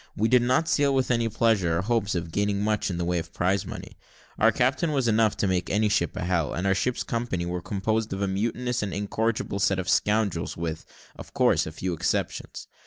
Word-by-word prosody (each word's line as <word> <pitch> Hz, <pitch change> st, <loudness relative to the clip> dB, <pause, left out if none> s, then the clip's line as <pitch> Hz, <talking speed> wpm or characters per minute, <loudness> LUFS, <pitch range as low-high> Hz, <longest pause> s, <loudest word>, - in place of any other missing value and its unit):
We 110 Hz, +2 st, +1 dB
did 125 Hz, -1 st, +5 dB
not 130 Hz, +6 st, +2 dB
sail 140 Hz, -3 st, +2 dB
with 130 Hz, -1 st, +1 dB
any 115 Hz, -1 st, +1 dB
pleasure, 105 Hz, -7 st, +2 dB
or 90 Hz, -, -1 dB
hopes 105 Hz, -3 st, 0 dB
of 85 Hz, -1 st, -3 dB
gaining 100 Hz, +2 st, 0 dB
much 105 Hz, -1 st, 0 dB
in 90 Hz, -, -3 dB
the 85 Hz, -, -2 dB
way 90 Hz, 0 st, 0 dB
of 85 Hz, 0 st, -8 dB
prize 95 Hz, +2 st, 0 dB
money. -, -, -9 dB, 0.4 s
Our -, -, +5 dB
captain 140 Hz, +6 st, +1 dB
was 135 Hz, -4 st, +1 dB
enough 110 Hz, -1 st, +2 dB
to 100 Hz, -, 0 dB
make 90 Hz, -1 st, 0 dB
any 105 Hz, +1 st, +2 dB
ship 85 Hz, -4 st, 0 dB
a -, -, -3 dB
hell; 85 Hz, -3 st, 0 dB
and 90 Hz, -, -2 dB
our 95 Hz, -, +3 dB
ship's 120 Hz, +6 st, -1 dB
company 115 Hz, -7 st, -2 dB
were 90 Hz, 0 st, -3 dB
composed 110 Hz, +4 st, -1 dB
of 95 Hz, +1 st, -2 dB
a -, -, +1 dB
mutinous 115 Hz, +5 st, -1 dB
and 100 Hz, -4 st, -3 dB
incorrigible 105 Hz, 0 st, -1 dB
set 100 Hz, -1 st, +2 dB
of 95 Hz, 0 st, -3 dB
scoundrels, 105 Hz, -6 st, +1 dB
with, 80 Hz, -1 st, -4 dB, 0.3 s
of -, -, -12 dB
course, -, -, +3 dB
a -, -, -5 dB
few 90 Hz, +3 st, -3 dB
exceptions. 85 Hz, -, -2 dB
100 Hz, 225 wpm, -26 LUFS, 90-115 Hz, 0.4 s, did